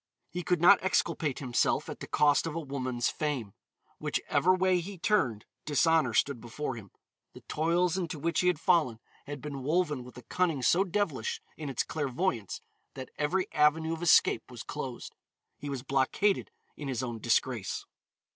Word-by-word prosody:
He 180 - -3
could 180 0 +1
not 185 +4 +7
exculpate 165 -6 0
himself 125 -3 0
at - - -7
the - - -7
cost 150 +2 +3
of 160 - -4
a - - -1
woman's 130 -5 -2
fame. 135 -10 -3 0.5
Which - - -1
ever 185 - +4
way 185 -1 +2
he 190 +3 -7
turned, 165 - +1 0.2
dishonor 150 -4 +2
stood 140 -5 +1
before 125 +3 -4
him. 105 -4 -10 0.4
The - - -12
toils 170 +3 +1
into 170 -3 -3
which 165 +3 0
he 180 - +2
had 180 -4 +2
fallen 160 - +2 0.3
had 145 -2 -6
been 140 -1 -6
woven 150 -2 0
with 125 0 -13
a 125 - -10
cunning 165 -2 0
so 175 +9 +4
devilish 205 - -1 0.2
in 150 -3 -6
its 130 - 0
clairvoyance 140 - -2 0.3
that 130 -1 -8
every 180 +6 +1
avenue 160 +2 +3
of 165 - -6
escape 175 - +4
was - - -8
closed. - - -6 0.5
He 145 - -6
was 135 -3 -4
blockaded 140 +10 +1 0.3
in 145 - -7
his 130 -2 -2
own 120 -2 -4
disgrace. 120 -2 0
150 Hz, 175 wpm, -30 LUFS, 130-175 Hz, 0.5 s, not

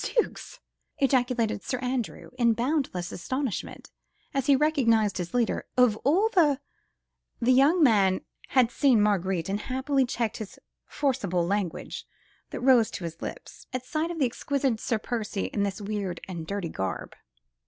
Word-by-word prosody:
"Zooks!" - - -2 0.4
ejaculated 250 -6 +1
Sir 255 - -3
Andrew 250 -2 -3
in 235 -1 +4
boundless 235 - -1
astonishment 255 +6 -4 0.4
as 275 -1 -1
he 280 - +6
recognised 230 -9 +2
his 175 +5 -4
leader, 240 -2 0
"of 250 -4 +5
all 345 - +3
the.. 305 - +3 0.4
." - - -57 0.3
The 250 +2 +4
young 295 +7 +5
man 200 -7 +4 0.3
had 250 -3 +3
seen 265 -5 +4
Marguerite, 190 -4 +1
and 200 +1 -1
happily 265 +3 0
checked 235 -3 -2
the 215 -3 -8 0.3
forcible 200 - 0
language 195 -2 -3 0.4
that - - -6
rose 245 -3 +5
to 185 - -7
his 165 0 -6
lips, - - -8
at 255 0 -3
sight 310 +5 -1
of 345 - -5
the 285 - +3
exquisite 260 -1 -1
Sir 225 - 0
Percy 215 -3 -3
in 205 - 0
this 200 -2 -1
weird 200 -4 -3
and 170 -4 -6
dirty 200 -3 -3
garb. 95 - -4
235 Hz, 155 wpm, -27 LUFS, 200-270 Hz, 0.4 s, he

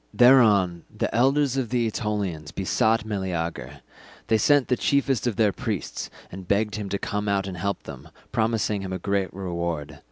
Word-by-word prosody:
Thereon 105 -9 +5
the - - -3
elders 135 +3 +2
of 130 -4 -1
the 120 -2 +1
Aetolians 100 -9 -3
besought 110 +4 +1
Meleager; 95 -6 -4 0.5
they 110 - +4
sent 145 +4 +4
the 125 - +2
chiefest 135 -1 +1
of 115 - -1
their 105 0 +3
priests, - - -4 0.2
and 95 0 -9
begged 105 +2 +1
him 105 -2 -4
to 100 - -1
come 105 +1 -3
out 100 -1 +1
and 95 -2 -5
help 100 +3 -2
them, - - -10 0.2
promising 110 -3 0
him 95 -1 -5
a - - -1
great 100 -2 -1
reward. 85 -5 -4
105 Hz, 170 wpm, -25 LUFS, 95-115 Hz, 0.5 s, Thereon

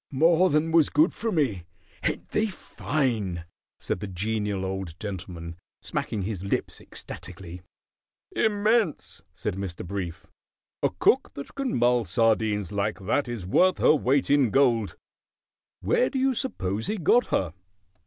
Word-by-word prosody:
"More 165 +6 +4
than 155 +2 +1
was 160 -2 +5
good 155 +5 +3
for 225 0 -2
me. 130 - 0 0.4
Ain't - - -2
they 220 +1 +1
fine?" 115 - -2 0.3
said - - -3
the 105 - -5
Genial 100 +1 -2
Old 95 -3 -5
Gentleman, 85 -4 -6 0.3
smacking 105 -3 -2
his 95 -2 -4
lips 100 - -2
ecstatically. 90 +1 -9 0.7
"Immense!" 215 -3 +1
said - - -4
Mr. 95 -3 -5
Brief. 90 -2 -5 0.6
"A - - +3
cook - - +2
that 140 - -8
can 275 -2 -1
mull 120 0 +3
sardines 105 0 +1
like 100 +1 -1
that 135 +6 +1
is 120 -6 -5
worth 185 - +3
her - - +5
weight 140 -1 +2
in 140 -4 +4
gold. 115 -6 +2 0.9
Where 115 - +2
do 270 - -3
you 265 0 +2
suppose 110 - -2
he 215 - -1
got 235 +8 +3
her?" 85 -4 0
110 Hz, 145 wpm, -26 LUFS, 95-155 Hz, 0.9 s, was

